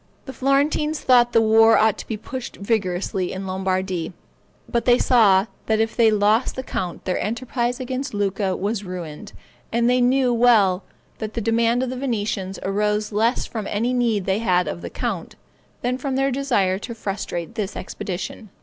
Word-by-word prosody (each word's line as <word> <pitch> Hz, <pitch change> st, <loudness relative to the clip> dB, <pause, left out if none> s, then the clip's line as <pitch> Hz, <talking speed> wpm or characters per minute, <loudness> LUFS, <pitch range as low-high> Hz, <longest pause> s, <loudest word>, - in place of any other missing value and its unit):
The 265 Hz, -, -7 dB
Florentines 290 Hz, +3 st, +1 dB
thought 240 Hz, -2 st, +4 dB
the 230 Hz, -, +4 dB
war 225 Hz, +1 st, +6 dB
ought 220 Hz, -1 st, +3 dB
to -, -, -8 dB
be 220 Hz, -, -3 dB
pushed 250 Hz, +3 st, -7 dB
vigorously 190 Hz, -3 st, -1 dB
in 190 Hz, +1 st, -5 dB
Lombardy; 185 Hz, -2 st, -2 dB, 0.5 s
but 235 Hz, -2 st, -1 dB
they 245 Hz, -1 st, +5 dB
saw 210 Hz, -8 st, +4 dB, 0.2 s
that 220 Hz, -1 st, +2 dB
if 225 Hz, 0 st, 0 dB
they 230 Hz, -2 st, +5 dB
lost 215 Hz, +3 st, +2 dB
the 260 Hz, -, -4 dB
count 180 Hz, -8 st, -4 dB
their 185 Hz, -, -1 dB
enterprise 240 Hz, +3 st, -2 dB
against 260 Hz, -1 st, -4 dB
Lucca 195 Hz, -1 st, -1 dB
was 205 Hz, +2 st, -2 dB
ruined; 180 Hz, +1 st, -7 dB, 0.4 s
and 235 Hz, +1 st, +2 dB
they 250 Hz, 0 st, +3 dB
knew 250 Hz, 0 st, +3 dB
well 215 Hz, -6 st, +4 dB, 0.4 s
that 215 Hz, -1 st, -5 dB
the -, -, 0 dB
demand 230 Hz, +2 st, +2 dB
of 255 Hz, -, -2 dB
the 255 Hz, -, -5 dB
Venetians 205 Hz, -7 st, -2 dB
arose 210 Hz, +2 st, 0 dB
less 225 Hz, +4 st, +1 dB
from 220 Hz, -3 st, -5 dB
any 230 Hz, +5 st, 0 dB
need 230 Hz, -6 st, +1 dB
they 195 Hz, +2 st, +1 dB
had 180 Hz, -5 st, +2 dB
of 170 Hz, -, -4 dB
the -, -, -6 dB
count, -, -, -4 dB, 0.5 s
than 250 Hz, +1 st, -1 dB
from 270 Hz, 0 st, -2 dB
their 270 Hz, +1 st, +1 dB
desire 235 Hz, -9 st, +1 dB
to 235 Hz, +2 st, -7 dB
frustrate 195 Hz, -3 st, -4 dB
this 210 Hz, -3 st, -4 dB
expedition. 195 Hz, +3 st, -6 dB
220 Hz, 175 wpm, -22 LUFS, 195-245 Hz, 0.5 s, war